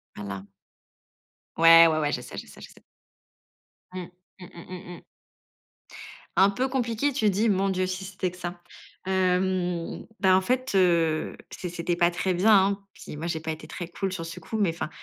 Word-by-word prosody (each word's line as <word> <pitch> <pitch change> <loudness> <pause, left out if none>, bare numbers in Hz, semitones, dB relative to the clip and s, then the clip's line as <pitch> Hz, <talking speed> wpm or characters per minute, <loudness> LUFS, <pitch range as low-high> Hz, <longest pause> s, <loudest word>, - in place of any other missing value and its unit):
Voilà. 100 -1 -6 1.1
Ouais, 165 0 +9
ouais, 155 -1 +1
ouais, 145 -1 0
je - - -1
sais, - - -10
je - - -7
sais, - - -14
je - - -9
sais. - - -19 1.1
Mmh, 180 -1 -6 0.3
mmh, 180 - -9
mmh, 170 - -12
mmh, 180 -1 -8
mmh. - - -18 1.3
«Un 195 +1 +6
peu 250 +6 -1
compliqué», 255 +1 -1
tu 220 -6 +2
dis? 205 +4 +1
Mon 195 -1 +2
Dieu, 185 -1 0
si 185 +1 -4
c'était 190 -1 -3
que 180 - -14
ça. 175 0 -6 0.5
Hem, 185 -2 0
ben, 190 -2 +5
en 190 - +4
fait, 255 +5 -1
heu, 170 -4 +2
c 180 - -6
c'était 170 0 -2
pas 170 0 +3
très 185 +2 -1
bien, 190 +5 +3
hein. 195 0 +3
Puis - - -10
moi, 160 +3 -5
j'ai 165 -2 -2
pas 160 0 -4
été 155 - -8
très 175 - -6
cool 190 +2 -3
sur 175 -3 -5
ce 165 +2 -8
coup, 220 +7 -5
mais 200 -5 +2
enfin, 165 -1 -5
180 Hz, 195 wpm, -26 LUFS, 170-195 Hz, 1.3 s, Ouais